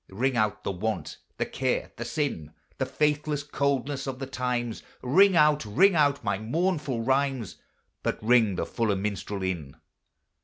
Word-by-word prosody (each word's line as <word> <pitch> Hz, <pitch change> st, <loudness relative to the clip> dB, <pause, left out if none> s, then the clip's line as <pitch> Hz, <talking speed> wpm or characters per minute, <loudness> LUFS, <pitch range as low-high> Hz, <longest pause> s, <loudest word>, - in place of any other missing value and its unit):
Ring 125 Hz, +7 st, 0 dB
out 110 Hz, -3 st, 0 dB
the -, -, -1 dB
want, 105 Hz, +4 st, -3 dB, 0.2 s
the -, -, 0 dB
care, 130 Hz, -1 st, -1 dB
the 120 Hz, -, -5 dB
sin, 120 Hz, -, -3 dB, 0.3 s
The 130 Hz, -, 0 dB
faithless 150 Hz, +1 st, 0 dB
coldness 140 Hz, -1 st, -1 dB
of 130 Hz, -1 st, -3 dB
the 135 Hz, -, -4 dB
times; 125 Hz, -3 st, -2 dB, 0.2 s
Ring 185 Hz, +9 st, +5 dB
out, 150 Hz, -2 st, +4 dB
ring 170 Hz, -, +4 dB
out 145 Hz, -3 st, +2 dB
my 95 Hz, -, 0 dB
mournful 150 Hz, 0 st, -1 dB
rhymes, 135 Hz, -4 st, 0 dB, 0.4 s
But -, -, -1 dB
ring 110 Hz, -4 st, +4 dB
the -, -, -1 dB
fuller 110 Hz, -4 st, 0 dB
minstrel 100 Hz, 0 st, -3 dB
in. 80 Hz, -6 st, -3 dB
130 Hz, 155 wpm, -27 LUFS, 110-145 Hz, 0.4 s, Ring